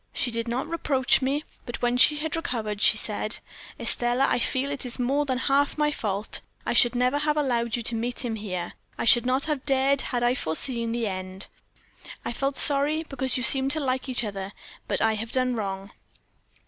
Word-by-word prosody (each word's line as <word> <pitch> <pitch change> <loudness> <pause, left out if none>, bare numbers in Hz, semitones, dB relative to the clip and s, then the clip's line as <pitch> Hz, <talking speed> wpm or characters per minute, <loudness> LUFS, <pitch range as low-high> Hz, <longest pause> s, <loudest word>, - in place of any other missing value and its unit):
She 245 - +1
did 230 0 -3
not 245 +5 -1
reproach 295 -6 +1
me; 275 +3 0 0.2
but 240 - -6
when 240 0 +2
she 290 +4 +7
had 310 +1 -2
recovered, 220 -10 -3
she - - +6
said: - - -1 0.4
"'Estelle, 240 +1 +1
I 275 - +2
feel 260 +3 0
that 285 -1 -4
it - - -5
is 240 - -7
more 275 +4 0
than 260 -1 0
half 280 +3 +1
my 300 0 +2
fault 205 -6 -2 0.2
I - - 0
should 240 0 +5
never 250 +3 +2
have 300 0 0
allowed 240 -5 0
you 235 - -4
to 235 - +1
meet 240 +3 -3
him 230 -2 -2
here. 185 -5 -5 0.2
I - - -2
should 240 +1 +6
not 260 +2 +2
have 300 -4 -2
dared 270 0 +2
if - - -5
I 240 -1 +2
had 250 - 0
foreseen 230 - -1
the 235 0 -1
end. 185 -1 -3 0.8
I - - -2
felt 275 +2 -2
sorry, 295 +3 +2
because 265 -4 0
you 250 - -2
seemed 265 +2 +4
to 315 - -2
like 260 -1 -2
each 245 -1 0
other; 200 -2 -5 0.3
but - - -1
I 220 0 +3
have 220 +1 -3
done 255 -1 +2
wrong.' 195 -2 -4
250 Hz, 210 wpm, -26 LUFS, 230-275 Hz, 0.8 s, she